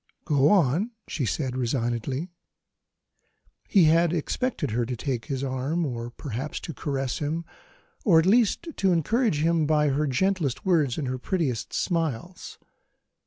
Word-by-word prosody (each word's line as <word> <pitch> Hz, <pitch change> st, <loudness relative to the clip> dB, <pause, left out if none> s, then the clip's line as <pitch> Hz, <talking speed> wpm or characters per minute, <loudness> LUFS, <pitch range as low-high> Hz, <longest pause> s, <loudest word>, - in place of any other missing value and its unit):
"Go 145 Hz, -2 st, +3 dB
on," 180 Hz, -, +3 dB, 0.2 s
she 135 Hz, -7 st, -2 dB
said 130 Hz, -2 st, -2 dB
resignedly. 125 Hz, +5 st, -2 dB, 1.4 s
He 195 Hz, -5 st, +5 dB
had 165 Hz, +1 st, +4 dB
expected 170 Hz, -, -2 dB
her 120 Hz, +2 st, 0 dB
to 125 Hz, +2 st, -3 dB
take 125 Hz, -1 st, -3 dB
his 135 Hz, -3 st, -3 dB
arm, 135 Hz, +6 st, -1 dB
or 120 Hz, -3 st, -4 dB
perhaps 130 Hz, +2 st, -5 dB
to 165 Hz, -, -6 dB
caress 135 Hz, -3 st, -3 dB
him, 160 Hz, +3 st, -2 dB, 0.6 s
or 180 Hz, -7 st, +5 dB
at 160 Hz, -, +4 dB
least 235 Hz, -, +3 dB
to 190 Hz, -1 st, +2 dB
encourage 180 Hz, -, +1 dB
him 165 Hz, -2 st, +2 dB
by 150 Hz, -1 st, +3 dB
her 145 Hz, +2 st, 0 dB
gentlest 155 Hz, -1 st, 0 dB
words 155 Hz, -9 st, +2 dB
and 145 Hz, -, -2 dB
her 130 Hz, 0 st, -3 dB
prettiest 135 Hz, -, -2 dB
smiles. 165 Hz, -1 st, -2 dB
150 Hz, 145 wpm, -26 LUFS, 130-170 Hz, 1.4 s, He